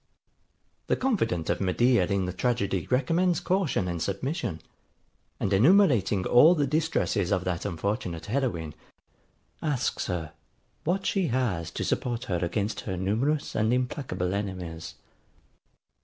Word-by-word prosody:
The -, -, +2 dB
confident 115 Hz, -, 0 dB
of -, -, -2 dB
Medea 100 Hz, +1 st, +3 dB
in 100 Hz, -1 st, 0 dB
the 90 Hz, -, -3 dB
tragedy 100 Hz, -4 st, -1 dB
recommends 165 Hz, +7 st, +2 dB
caution 180 Hz, -, 0 dB
and 85 Hz, -2 st, -3 dB
submission; 110 Hz, -, -2 dB, 0.8 s
and 100 Hz, -, 0 dB
enumerating 115 Hz, -, +4 dB
all 155 Hz, +9 st, +7 dB
the 145 Hz, -3 st, +1 dB
distresses 150 Hz, -, 0 dB
of 90 Hz, -, +1 dB
that 90 Hz, -2 st, -2 dB
unfortunate 90 Hz, -2 st, -3 dB
heroine, 105 Hz, -, -2 dB, 0.9 s
asks 145 Hz, -5 st, -1 dB
her, 80 Hz, -4 st, -3 dB, 0.5 s
what 190 Hz, +4 st, 0 dB
she 190 Hz, -4 st, +1 dB
has 115 Hz, -, -1 dB
to -, -, -4 dB
support 120 Hz, -1 st, -1 dB
her 90 Hz, -8 st, -1 dB
against 100 Hz, +4 st, -1 dB
her 95 Hz, -3 st, -4 dB
numerous 115 Hz, +11 st, 0 dB
and 110 Hz, +1 st, +1 dB
implacable 125 Hz, -, -1 dB
enemies. 90 Hz, -5 st, -5 dB
110 Hz, 125 wpm, -27 LUFS, 90-140 Hz, 0.9 s, all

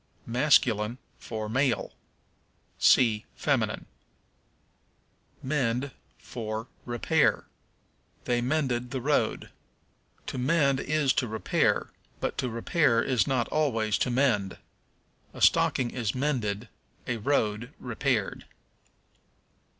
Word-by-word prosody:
Masculine 120 Hz, -3 st, +2 dB, 0.2 s
for 110 Hz, -2 st, -5 dB
Male. 130 Hz, +3 st, 0 dB, 0.9 s
See 110 Hz, -4 st, +4 dB
Feminine. -, -, 0 dB, 1.6 s
Mend 130 Hz, -1 st, 0 dB, 0.3 s
for 110 Hz, -1 st, -5 dB, 0.2 s
Repair. 140 Hz, +6 st, +1 dB, 0.8 s
"They 120 Hz, -1 st, +1 dB
mended 125 Hz, -2 st, 0 dB
the 130 Hz, -, -3 dB
road." 145 Hz, +4 st, 0 dB, 0.7 s
To -, -, -4 dB
mend 140 Hz, 0 st, +2 dB
is 150 Hz, -2 st, +1 dB
to 125 Hz, -, 0 dB
repair, 110 Hz, 0 st, 0 dB, 0.3 s
but -, -, -2 dB
to 130 Hz, -2 st, -1 dB
repair 115 Hz, +1 st, +2 dB
is 130 Hz, -1 st, +1 dB
not 130 Hz, -4 st, +1 dB
always 115 Hz, -9 st, +1 dB
to -, -, +1 dB
mend. 120 Hz, -7 st, +1 dB, 0.8 s
A -, -, -8 dB
stocking 125 Hz, -2 st, +3 dB
is 115 Hz, -4 st, -2 dB
mended, 120 Hz, -6 st, -1 dB, 0.4 s
a 120 Hz, -, -2 dB
road 115 Hz, -1 st, 0 dB
repaired. 125 Hz, -3 st, -1 dB
125 Hz, 95 wpm, -28 LUFS, 115-140 Hz, 1.6 s, See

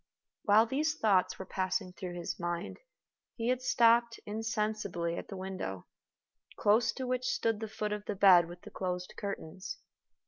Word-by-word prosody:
While 215 Hz, +2 st, +6 dB
these 300 Hz, +6 st, 0 dB
thoughts 200 Hz, -7 st, +3 dB
were 190 Hz, -, -6 dB
passing 185 Hz, -1 st, -2 dB
through 180 Hz, -1 st, -6 dB
his 175 Hz, -1 st, -4 dB
mind, 175 Hz, 0 st, -3 dB, 0.6 s
he 230 Hz, 0 st, -1 dB
had 255 Hz, 0 st, +1 dB
stopped 235 Hz, -1 st, +4 dB
insensibly 210 Hz, -5 st, -2 dB
at -, -, -6 dB
the 195 Hz, -, -7 dB
window, 185 Hz, -, -5 dB, 0.7 s
close 220 Hz, +2 st, +4 dB
to 260 Hz, -, -4 dB
which 255 Hz, 0 st, -1 dB
stood 225 Hz, -3 st, 0 dB
the 220 Hz, -, -4 dB
foot 210 Hz, 0 st, -3 dB
of 210 Hz, 0 st, -5 dB
the 210 Hz, -, -3 dB
bed 185 Hz, -3 st, +7 dB
with 175 Hz, 0 st, -10 dB
the -, -, -10 dB
closed 180 Hz, -1 st, -3 dB
curtains. 195 Hz, -, -5 dB
205 Hz, 165 wpm, -32 LUFS, 180-230 Hz, 0.7 s, bed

